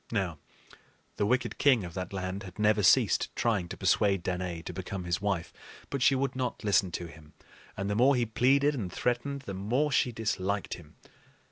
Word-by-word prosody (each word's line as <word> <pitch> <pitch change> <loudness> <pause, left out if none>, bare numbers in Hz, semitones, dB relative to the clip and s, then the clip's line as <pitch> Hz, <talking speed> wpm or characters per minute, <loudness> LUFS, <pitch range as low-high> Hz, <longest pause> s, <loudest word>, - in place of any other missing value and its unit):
Now, 95 -8 -1 0.8
the 100 - +1
wicked 125 +1 0
king 130 -7 +4
of 85 -1 -7
that 90 0 -5
land 95 0 -4
had 95 -3 -10
never 105 0 +3
ceased 95 - +4
trying 105 -7 0
to - - -7
persuade 100 -4 +2
Danaë 90 -2 -3
to 90 - -5
become 95 +1 -5
his 85 +1 -1
wife; 100 -5 -2 0.4
but 140 - -2
she 135 - +5
would 135 0 -1
not 125 -3 -3
listen 100 -2 +3
to 85 - -3
him, 80 -2 -14 0.4
and 100 +1 -2
the 100 - 0
more 130 +6 +4
he 120 -1 +1
pleaded 140 +6 +3
and 105 -10 -4
threatened, 125 +6 -1
the 100 - -7
more 120 +11 0
she 125 - +2
disliked 105 -3 -2
him. 80 -3 -11
100 Hz, 195 wpm, -29 LUFS, 90-125 Hz, 0.8 s, she